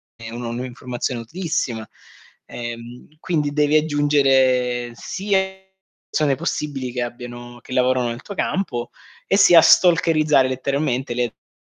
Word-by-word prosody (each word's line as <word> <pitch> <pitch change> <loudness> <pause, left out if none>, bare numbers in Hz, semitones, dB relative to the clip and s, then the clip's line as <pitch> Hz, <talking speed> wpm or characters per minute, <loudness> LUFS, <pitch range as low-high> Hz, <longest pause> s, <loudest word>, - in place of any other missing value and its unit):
è 115 -1 -9
un'informazione 120 +1 -4
utilissima. 120 -6 -3 0.6
Ehm, 120 +1 -8
quindi 150 -5 -1
devi 150 0 +2
aggiungere 135 -5 +2
sia 195 +8 -1 0.7
persone 145 -3 +1
possibili 140 -4 -3
che 125 0 -2
abbiano 120 0 -8
che 130 - -9
lavorano 125 -1 +2
nel 120 +1 -6
tuo 200 - -7
campo 125 -15 -2 0.4
e 195 - +3
sia 175 -4 +8
stalkerizzare 155 -5 +4
letteralmente 130 -1 -1
le 125 0 0
a 115 - -13
130 Hz, 120 wpm, -21 LUFS, 120-150 Hz, 0.7 s, sia